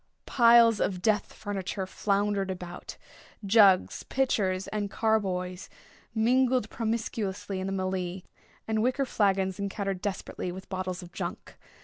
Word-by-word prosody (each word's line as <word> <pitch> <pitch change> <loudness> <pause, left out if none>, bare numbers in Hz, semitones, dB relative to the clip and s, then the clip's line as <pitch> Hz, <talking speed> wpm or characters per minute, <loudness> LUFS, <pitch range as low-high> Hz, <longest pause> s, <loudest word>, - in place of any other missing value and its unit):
Piles 235 -3 +6
of 185 -2 0
death 215 -2 +1
furniture 195 -1 -4
floundered 200 0 0
about. 180 -1 -7 0.5
Jugs, 195 -3 +5
pitchers, 195 -8 0
and 210 -1 -2
carboys 190 -5 -1 0.5
mingled 250 0 +2
promiscuously 220 -4 -3
in 190 - -3
the - - -2
mêlée, 185 -1 -3 0.4
and 220 -1 0
wicker 255 +4 +1
flagons 195 -4 +1
encountered 195 -1 -3
desperately 190 -2 -4
with 190 +1 -9
bottles 185 -1 -4
of 175 - -12
junk. - - -6
200 Hz, 120 wpm, -28 LUFS, 185-220 Hz, 0.5 s, Piles